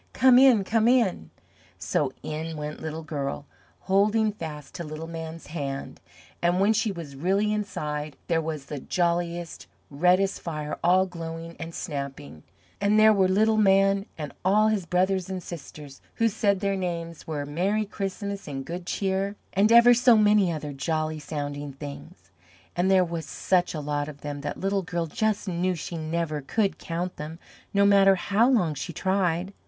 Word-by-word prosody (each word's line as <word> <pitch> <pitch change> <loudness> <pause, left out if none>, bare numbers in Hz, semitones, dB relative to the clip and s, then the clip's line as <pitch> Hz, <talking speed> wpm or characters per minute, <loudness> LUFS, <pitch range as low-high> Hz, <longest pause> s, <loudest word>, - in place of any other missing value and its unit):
Come 255 -1 +6
in! 255 -6 +6
Come 225 +3 +2
in!" 230 - +2 0.5
So - - -1
in 160 +1 -4
went 150 0 -6
Little 160 0 -5
Girl, 145 -2 -4 0.4
holding 210 +3 +2
fast 150 -7 -8
to 170 - -5
Little 155 +1 -6
Man's 165 0 -7
hand, 140 -4 -5 0.4
and 175 +1 +2
when 205 +3 +4
she 220 0 +1
was 165 -7 -8
really 195 +8 +1
inside 150 -8 -4
there 165 -1 +2
was 155 -3 -5
the 145 0 -6
jolliest, 170 +1 -2 0.2
reddest 180 +6 +2
fire 150 -3 -4
all 185 +2 +4
glowing 165 -2 -7
and 165 0 -7
snapping, 140 - -6 0.4
and 205 +1 +3
there 215 0 +7
were 190 -2 +3
Little 215 +4 +3
Man 195 -1 +4
and 150 -3 -6
all 210 +4 +4
his 200 -5 -1
brothers 185 +1 +1
and 185 -2 -4
sisters, 150 -4 -10
who 230 - +2
said 200 -2 +1
their 200 -1 0
names 170 -3 -4
were 150 -3 -3
"Merry 190 +9 0
Christmas," 200 -1 -5
and 135 -2 -5
"Good 175 +1 -6
Cheer," 195 +1 -1 0.2
and 205 +3 +3
ever 235 +1 +8
so 240 -1 +5
many 210 -3 +4
other 150 -2 -5
jolly 155 +2 -2
sounding 145 -1 -5
things, 140 +1 -10 0.4
and 180 +2 +1
there 190 -1 +5
were 170 -1 -4
such 180 +1 0
a - - -3
lot 145 0 -2
of 145 -1 -11
them 145 -1 -5
that 145 0 -5
Little 195 +1 0
Girl 175 -1 -2
just 215 +6 -1
knew 180 0 0
she 170 +1 -6
never 160 -1 -2
could 200 +8 -1
count 175 +2 -4
them, 155 +2 -6 0.3
no 200 0 +3
matter 195 -1 +6
how 205 +6 +2
long 185 - +2
she 150 +4 -6
tried. 185 0 0
175 Hz, 170 wpm, -26 LUFS, 155-200 Hz, 0.5 s, ever